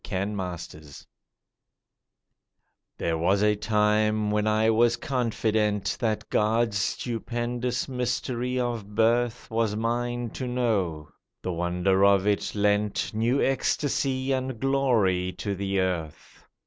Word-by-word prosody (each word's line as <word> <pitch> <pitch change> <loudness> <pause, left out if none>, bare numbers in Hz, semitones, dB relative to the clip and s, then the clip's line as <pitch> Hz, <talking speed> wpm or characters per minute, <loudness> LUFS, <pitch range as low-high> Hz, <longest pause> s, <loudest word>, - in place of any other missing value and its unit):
CERTITUDE 90 -6 -5 1.9
THERE 80 -1 -1
was 95 +5 +2
a 105 0 +4
time 105 0 +1
when 105 0 +1
I 110 +1 +3
was 120 +2 +3
confident 110 -5 0
That 110 -3 -1
God's 110 -1 +2
stupendous 120 +3 -2
mystery 125 0 -2
of 115 -4 -3
birth 120 +2 +1
Was 110 -2 0
mine 120 +1 -2
to 130 - -5
know. 100 -12 -1 0.3
The 90 - -2
wonder 90 +3 +1
of 100 -1 +5
it 105 0 0
lent 105 +1 +1
New 115 +5 +1
ecstasy 135 0 0
and 130 -2 -2
glory 110 -10 +1
to 100 - -3
the 100 0 -1
earth. 90 -5 -4
110 Hz, 110 wpm, -26 LUFS, 100-120 Hz, 1.9 s, of